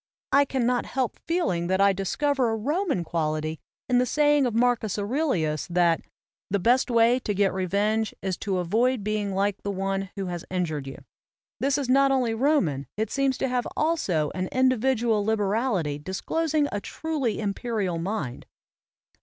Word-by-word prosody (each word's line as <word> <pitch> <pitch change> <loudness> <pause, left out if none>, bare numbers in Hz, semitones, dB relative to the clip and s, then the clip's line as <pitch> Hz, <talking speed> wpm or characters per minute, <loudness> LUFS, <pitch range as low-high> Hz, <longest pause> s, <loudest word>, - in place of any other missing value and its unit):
I 280 +1 +5
can 260 -3 -1
not 245 0 +1
help 255 -3 -2
feeling 190 - 0
that 190 +1 +1
I 200 0 +5
discover 255 +7 0
a 225 - 0
Roman 290 - -1
quality 155 -1 -2 0.3
in 250 -1 +3
the 250 - +2
saying 295 -2 +3
of 230 - -3
Marcus 235 -4 +1
Aurelius, 205 - -1
that 175 -1 +2 0.5
"the 200 - +1
best 245 +7 +2
way 235 +1 +4
to 210 -5 -3
get 195 -1 +2
revenge 205 +4 0
is 190 -2 -2
to 195 -3 -2
avoid 220 +7 +1
being 205 -2 -1
like 200 0 0
the 200 - -4
one 195 0 -2
who 195 -1 -3
has 175 -2 -4
injured 155 -7 -2
you." 135 - -9 0.6
This 275 +1 +1
is 280 -3 -2
not 275 +2 +4
only 255 -4 +1
Roman, 225 - +1
it 220 0 -1
seems 275 -2 +1
to 265 - 0
have 250 -1 -1
also 195 - +1
an 185 0 -2
individual 255 -4 +2
liberality 205 - 0
disclosing 300 - -1
a 205 - -3
truly 285 -4 -2
imperial 205 -4 -2
mind. 170 - -4
215 Hz, 165 wpm, -26 LUFS, 185-260 Hz, 0.6 s, I